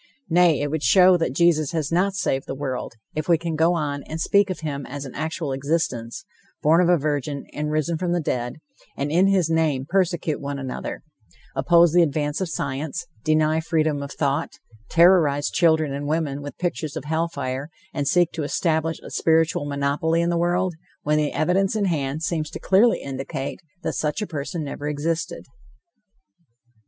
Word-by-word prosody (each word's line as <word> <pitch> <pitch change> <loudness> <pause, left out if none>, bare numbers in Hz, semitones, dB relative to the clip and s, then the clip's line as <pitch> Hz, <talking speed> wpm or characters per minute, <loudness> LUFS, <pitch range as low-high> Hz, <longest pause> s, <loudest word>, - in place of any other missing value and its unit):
Nay, 170 -4 +4
it 145 0 -1
would 160 -1 -1
show 185 +2 +6
that 165 -6 -2
Jesus 165 -3 +3
has 155 -2 -1
not 190 +3 +2
saved 135 -8 -1
the - - -4
world, 130 -4 -4 0.2
if 155 +2 -4
we 170 - +6
can 170 0 -4
go 165 +3 +3
on 145 -3 -2
and 160 - -5
speak 200 +4 +3
of 185 - -4
him 145 -3 -3
as 140 +1 -6
an 130 - -8
actual 160 -1 -3
existence, 135 -5 -2 0.4
born 160 +4 +5
of 175 - +3
a 175 - +5
virgin 145 -1 -2
and 150 0 -2
risen 155 +2 -1
from 180 -1 -1
the 175 - +1
dead, 125 -6 -2 0.4
and 140 +1 -2
in 180 +4 +4
his 190 -4 +3
name 160 -5 +1
persecute 175 -4 0
one 140 0 -4
another 130 -2 -5 0.5
oppose 170 -1 +5
the 175 - +6
advance 150 0 0
of 185 - -1
science, 140 -1 -3 0.2
deny 155 0 +2
freedom 155 -3 0
of 140 0 -6
thought, 145 +2 -1 0.4
terrorize 165 -5 +4
children 160 -4 +3
and 145 +1 -4
women 150 -2 -1
with 145 0 -8
pictures 155 -4 -3
of - - -4
hell 160 +2 0
fire 140 -2 -4 0.2
and 145 -2 -2
seek 175 +2 +3
to 165 - -4
establish 160 +1 0
a - - -10
spiritual 160 -2 +2
monopoly 145 +4 0
in 170 0 +1
the - - 0
world, 175 +2 +1 0.3
when 150 +1 +2
the 150 -1 0
evidence 190 +5 +1
in 210 -2 +1
hand 150 -3 -1
seems 165 -4 -1
clearly 210 +5 +4
to - - -10
indicate 135 0 -4 0.2
that - - -1
such 150 -1 -1
a 210 - -1
person 155 -1 -4
never 145 0 -5
existed. 155 +3 -2
155 Hz, 185 wpm, -23 LUFS, 145-170 Hz, 0.5 s, show